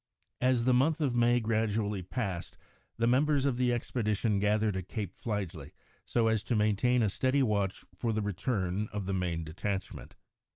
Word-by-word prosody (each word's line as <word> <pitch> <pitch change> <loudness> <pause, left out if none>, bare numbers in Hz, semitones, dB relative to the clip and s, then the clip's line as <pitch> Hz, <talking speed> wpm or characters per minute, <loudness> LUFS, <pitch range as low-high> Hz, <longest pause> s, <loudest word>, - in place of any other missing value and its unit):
] - - -45
As 120 -2 +1
the 130 - +4
month 145 +6 +3
of 140 -5 +1
May 120 0 +4
gradually 110 -3 0
passed, 95 -2 -4 0.4
the 115 - +1
members 140 +3 +3
of 135 -4 +1
the 125 -1 +2
expedition 110 -3 0
gathered 105 0 +1
at 95 -1 -4
Cape 100 -4 -4
Fligely 90 - -4 0.3
so 115 -2 +1
as 110 -2 +2
to 120 - 0
maintain 110 +3 +2
a - - +3
steady 130 +7 +1
watch 100 -5 -1
for 115 +5 -1
the 110 -1 -1
return 100 -1 -1
of 105 -2 -4
the 95 - -2
main 90 -3 -1
detachment. 95 +5 -5
110 Hz, 175 wpm, -30 LUFS, 100-120 Hz, 0.4 s, the